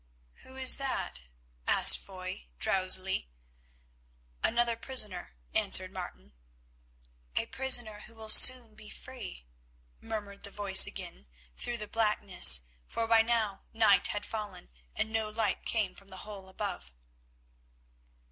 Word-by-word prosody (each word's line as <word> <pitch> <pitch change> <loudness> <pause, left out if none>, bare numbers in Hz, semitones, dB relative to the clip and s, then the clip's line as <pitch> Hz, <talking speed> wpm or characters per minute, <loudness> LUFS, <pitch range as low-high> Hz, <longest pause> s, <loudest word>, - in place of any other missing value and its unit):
"Who 260 - -16
is 260 -1 +3
that?" 265 - -5 0.5
asked - - +9
Foy 185 - -10
drowsily. 185 - 0 1.1
"Another 235 0 0
prisoner," 210 - -3 0.2
answered - - +2
Martin. 65 +2 -11 1.0
"A - - -1
prisoner 245 -5 +2
who 230 - -16
will 220 -1 -11
soon 240 0 +7
be 215 0 -14
free," 155 - -11 0.5
murmured 205 -2 -8
the - - -8
voice 200 -2 +2
again 65 +2 -9 0.3
through 240 - -5
the 210 -2 -8
blackness, 205 - +1 0.3
for 230 - -4
by 225 0 +3
now 225 -3 -3
night 220 -3 +3
had 205 0 -6
fallen, 210 - -9 0.2
and 220 - -4
no 220 -1 -1
light 215 -2 -3
came 210 -5 -2
from 195 - -17
the 190 -1 -12
hole 200 -3 -12
above. 65 - -8
210 Hz, 125 wpm, -28 LUFS, 190-230 Hz, 1.1 s, asked